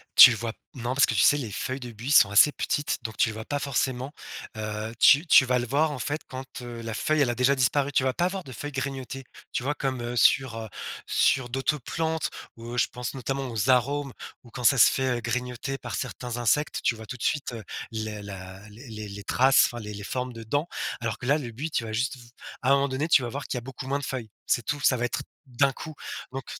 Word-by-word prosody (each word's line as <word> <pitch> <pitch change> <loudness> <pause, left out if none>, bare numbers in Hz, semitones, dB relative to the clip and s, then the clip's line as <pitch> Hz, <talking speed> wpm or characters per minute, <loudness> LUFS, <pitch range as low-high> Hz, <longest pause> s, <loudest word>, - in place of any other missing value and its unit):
Tu 125 - +12
vois 115 0 -4 0.2
non, 120 0 -2
parce 140 - +5
que, 120 - -2
tu 105 - +3
sais, 145 - +6
les 120 -7 -4
feuilles 130 +6 -3
de 120 -1 -7
buis 120 +6 -5
sont 105 -9 +7
assez 110 +8 +7
petites, 145 -2 -1
donc 110 -2 -6
tu 115 - +3
le - - -5
vois 110 - -6
pas 145 -1 -2
forcément, 130 -1 -1 0.5
heu, 110 +1 -4
tu 145 +5 +7
tu 130 - +7
vas 125 0 +2
le 120 - -3
voir, 150 +4 +2
en 135 - -5
fait, 145 +4 -2
quand, 130 0 -6 0.2
heu, 120 -1 -7
la 115 -1 -5
feuille, 155 +6 +1
elle 125 - +3
a 120 - -1
déjà 130 +2 +3
disparu? 135 +2 +1
Tu 130 - +3
vas 130 - +1
pas 175 - +1
avoir 185 0 -2
de 130 - -9
feuilles 145 +6 -6
grignotées, 135 0 -4 0.3
tu - - -1
vois? 145 +3 -1
Comme, 130 -4 -2
heu, 120 +1 -4
sur, 130 -4 +4
heu, 110 -1 -6 0.4
sur 125 -2 +2
d'autres 135 +4 0
plantes 160 +4 -2 0.3
où 120 +1 -7
je 120 - +3
pense, 125 0 -6
notamment, 135 0 -3
aux 115 +2 -1
arums, 135 +2 +2 0.3
où, 120 - -15
quand 125 0 -7
ça 135 - +6
se 110 - +8
fait, 130 -2 0
heu, - - -5
grignoter 125 +3 -3
par 120 -6 -6
certains 120 +2 -4
insectes, 140 +5 +1
tu 120 - +2
vois 110 0 -10
tout 125 - -7
de - - -8
suite, 145 -4 0
heu, 115 - -7 0.3
les 110 -2 -4
la 95 0 -9
les 120 +6 -13
les 110 -2 -7
les 100 0 -8
traces, 130 +2 +5
enfin 120 - -7
les 105 0 -7
les 100 0 -7
formes 125 +3 -3
de 115 0 -8
dents, 145 +9 -1 0.3
alors 115 -3 -2
que - - -8
là, 145 +4 +3
le 125 -6 -6
buis, 145 +8 -5
tu 115 - 0
vas 110 - -5
juste 125 +4 -1
v 120 - -14 0.4
à 130 - +1
un - - +8
moment 140 0 +2
donné, 135 +5 -1
tu 135 - +6
vas 120 - -3
voir 140 +3 -5
qu'il 125 - -3
y - - -1
a - - -12
beaucoup 130 +1 -8
moins 140 +1 0
de 140 - -5
feuilles. 120 -5 -4 0.2
C'est 120 - +1
tout, 145 +5 -2
ça 130 - +4
va 120 - 0
être - - -2 0.3
d'un 135 +2 +2
coup, 155 - -8 0.4
donc 135 -2 -6
125 Hz, 265 wpm, -26 LUFS, 115-140 Hz, 0.5 s, Tu